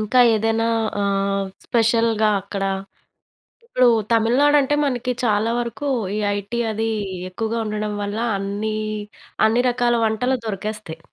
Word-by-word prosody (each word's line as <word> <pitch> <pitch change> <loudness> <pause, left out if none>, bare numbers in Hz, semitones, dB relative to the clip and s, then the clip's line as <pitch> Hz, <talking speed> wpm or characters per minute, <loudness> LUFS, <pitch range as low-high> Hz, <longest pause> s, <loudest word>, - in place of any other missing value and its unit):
ఇంకా 215 +4 +3
ఏదైనా 225 +1 +1 0.3
ఆహ్, 195 0 0 0.2
స్పెషల్‌గా 225 -1 +2
అక్కడా 195 -1 -2 1.0
ఇప్పుడూ 255 - +3 0.2
తమిళనాడంటే 270 +5 +4
మనకి 250 -2 -1
చాలా 215 0 +2
వరకూ 240 +4 -4 0.3
ఈ - - -1 0.2
ఐటీ 205 +4 -4
అదీ 220 +1 -1 0.4
ఎక్కువగా 225 +4 -3
ఉండడం 210 0 -2
వల్ల 205 +2 -3 0.2
అన్నీ, 205 +2 -3 0.7
అన్ని 225 +3 +3
రకాల 240 0 +1
వంటలు 250 +4 +1
దొరికేస్తయి. 210 -5 -5
220 Hz, 115 wpm, -21 LUFS, 205-240 Hz, 1.0 s, తమిళనాడంటే